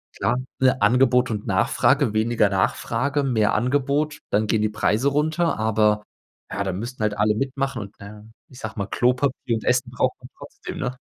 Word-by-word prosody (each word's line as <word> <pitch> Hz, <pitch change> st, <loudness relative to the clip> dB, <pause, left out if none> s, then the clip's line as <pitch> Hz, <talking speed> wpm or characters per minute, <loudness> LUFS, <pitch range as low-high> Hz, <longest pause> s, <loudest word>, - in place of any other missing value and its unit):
Klar, 120 Hz, +5 st, 0 dB, 0.2 s
ne, 130 Hz, 0 st, +3 dB
Angebot 125 Hz, +3 st, +4 dB
und 105 Hz, -2 st, -4 dB
Nachfrage. 110 Hz, +6 st, +2 dB
Weniger 110 Hz, -1 st, +2 dB
Nachfrage, 125 Hz, +8 st, 0 dB
mehr 110 Hz, -6 st, +1 dB
Angebot, 140 Hz, +5 st, 0 dB
dann 105 Hz, +1 st, +1 dB
gehen 110 Hz, 0 st, +1 dB
die 110 Hz, -, +1 dB
Preise 110 Hz, +5 st, +1 dB
runter, 155 Hz, +4 st, 0 dB
aber 105 Hz, -1 st, +2 dB, 0.5 s
ja, 100 Hz, -, -2 dB
da 95 Hz, -, -2 dB
müssten 115 Hz, +5 st, -6 dB
halt 105 Hz, -1 st, 0 dB
alle 105 Hz, +1 st, +2 dB
mitmachen 135 Hz, 0 st, -2 dB
und, 100 Hz, 0 st, -10 dB
na 100 Hz, -, -9 dB
ja, 105 Hz, 0 st, -12 dB, 0.2 s
ich 130 Hz, -, -14 dB
sage 110 Hz, -4 st, -6 dB
mal, 100 Hz, -1 st, -2 dB
Klopapier 125 Hz, 0 st, 0 dB
und 110 Hz, -, -4 dB
Essen 125 Hz, 0 st, +1 dB
braucht 125 Hz, +1 st, 0 dB
man 125 Hz, -, -13 dB
trotzdem, 145 Hz, -, -9 dB
ne? 125 Hz, 0 st, -3 dB
120 Hz, 185 wpm, -23 LUFS, 105-130 Hz, 0.5 s, Angebot